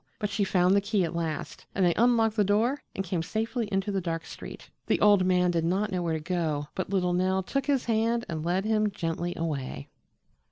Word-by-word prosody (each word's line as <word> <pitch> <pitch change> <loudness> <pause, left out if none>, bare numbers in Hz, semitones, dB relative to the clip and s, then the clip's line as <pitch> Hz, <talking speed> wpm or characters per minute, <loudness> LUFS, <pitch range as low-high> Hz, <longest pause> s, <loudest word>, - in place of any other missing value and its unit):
But 210 -1 -3
she 200 +1 0
found 185 0 +3
the 200 - +4
key 205 -1 +1
at 170 0 -3
last, 165 -2 -4
and 190 - +3
they 175 - +4
unlocked 225 -1 +3
the 210 - +3
door 225 +8 +1
and 195 - -2
came 180 -2 -1
safely 225 +6 -2
into 195 +1 0
the 195 -1 -1
dark 165 -1 -3
street. - - -9 0.2
The - - +2
old 205 -2 +5
man 180 -1 +3
did 165 -2 0
not 195 +5 0
know 180 -1 -1
where 165 -2 -1
to - - -2
go, 155 -3 -2
but 185 - -3
little 180 -2 +1
Nell 185 +1 +1
took 275 +8 -2
his 275 -3 +1
hand 230 +1 +1
and 155 -2 -4
led 180 +4 0
him 215 -1 +2
gently 175 -2 -3
away. 135 - -4
190 Hz, 225 wpm, -28 LUFS, 170-215 Hz, 0.2 s, old